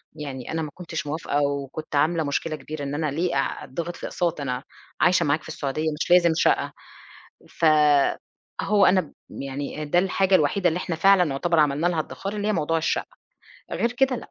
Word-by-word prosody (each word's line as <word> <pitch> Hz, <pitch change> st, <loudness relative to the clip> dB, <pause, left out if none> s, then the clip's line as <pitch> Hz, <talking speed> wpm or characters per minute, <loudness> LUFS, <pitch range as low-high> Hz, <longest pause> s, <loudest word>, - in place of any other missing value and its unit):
يعني 135 Hz, -5 st, -6 dB
أنا 160 Hz, 0 st, -1 dB
ما 150 Hz, -2 st, -5 dB
كنتش 165 Hz, -4 st, -6 dB
موافقة، 145 Hz, -1 st, -1 dB
وكنت 140 Hz, +2 st, -3 dB
عاملة 160 Hz, +3 st, +2 dB
مشكلة 155 Hz, +2 st, -2 dB
كبيرة 150 Hz, +1 st, -7 dB
إن 140 Hz, +1 st, -3 dB
أنا 155 Hz, -2 st, -1 dB
ليه 170 Hz, +3 st, -1 dB
أ 135 Hz, -, -1 dB
أتضغط 170 Hz, +5 st, -5 dB
في -, -, -8 dB
أقساط، 170 Hz, -4 st, -2 dB
أنا 130 Hz, -1 st, -3 dB, 0.4 s
عايشة 180 Hz, 0 st, +4 dB
معاك 150 Hz, +2 st, +1 dB
في -, -, -12 dB
السعودية، 155 Hz, +1 st, -2 dB
مش -, -, -2 dB
لازم 170 Hz, -2 st, +6 dB
شقة. -, -, +2 dB, 0.8 s
ف 165 Hz, -, -1 dB, 1.0 s
هو 205 Hz, -1 st, +4 dB
أنا 185 Hz, 0 st, +5 dB
ب 160 Hz, -, -11 dB, 0.3 s
يعني 140 Hz, +2 st, -5 dB
ده 165 Hz, +4 st, +1 dB
الحاجة 190 Hz, +1 st, +2 dB
الوحيدة 175 Hz, +3 st, +3 dB
اللي 170 Hz, +2 st, -1 dB
إحنا 170 Hz, -3 st, -3 dB
فعلًا 180 Hz, -2 st, +4 dB
يعتبر 165 Hz, +5 st, 0 dB
عملنا 150 Hz, +3 st, +2 dB
لها 175 Hz, -2 st, 0 dB
ادخار 195 Hz, +6 st, -5 dB
اللي 205 Hz, +1 st, -1 dB
هي -, -, +2 dB
موضوع 165 Hz, -2 st, 0 dB
الشقة. 160 Hz, -, -1 dB, 0.7 s
غير 235 Hz, +1 st, 0 dB
كده 265 Hz, 0 st, +2 dB
لأ. -, -, -10 dB
160 Hz, 195 wpm, -24 LUFS, 145-180 Hz, 1.0 s, لازم